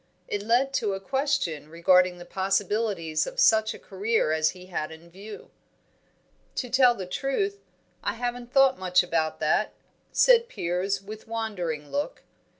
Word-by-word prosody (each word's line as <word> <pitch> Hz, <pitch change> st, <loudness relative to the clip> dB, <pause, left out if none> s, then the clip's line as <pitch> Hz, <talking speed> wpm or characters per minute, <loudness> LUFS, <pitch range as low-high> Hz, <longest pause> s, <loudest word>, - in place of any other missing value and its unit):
It 205 Hz, -, -2 dB
led 245 Hz, +6 st, +2 dB
to 210 Hz, -6 st, 0 dB
a -, -, -5 dB
question 265 Hz, -, -1 dB
regarding 180 Hz, +2 st, +3 dB
the 175 Hz, -, -10 dB
possibilities 195 Hz, -3 st, 0 dB
of -, -, -6 dB
such 220 Hz, -, +4 dB
a -, -, -9 dB
career 205 Hz, -3 st, 0 dB
as 155 Hz, 0 st, +2 dB
he 180 Hz, -, -12 dB
had 165 Hz, -4 st, -4 dB
in 165 Hz, +2 st, -13 dB
view. 205 Hz, +4 st, -11 dB, 1.0 s
"To 250 Hz, -3 st, -3 dB
tell 250 Hz, -1 st, +5 dB
the 190 Hz, -, -5 dB
truth, 285 Hz, -, -2 dB, 0.4 s
I 205 Hz, -, -1 dB
haven't 245 Hz, 0 st, -4 dB
thought 270 Hz, -1 st, +4 dB
much 180 Hz, -1 st, +3 dB
about 165 Hz, -3 st, -1 dB
that," -, -, +1 dB, 0.4 s
said 475 Hz, -1 st, +5 dB
Piers, 190 Hz, -, -2 dB
with 215 Hz, +2 st, -10 dB
wandering 180 Hz, -10 st, -4 dB
look. 290 Hz, +13 st, -3 dB
205 Hz, 150 wpm, -26 LUFS, 180-245 Hz, 1.0 s, tell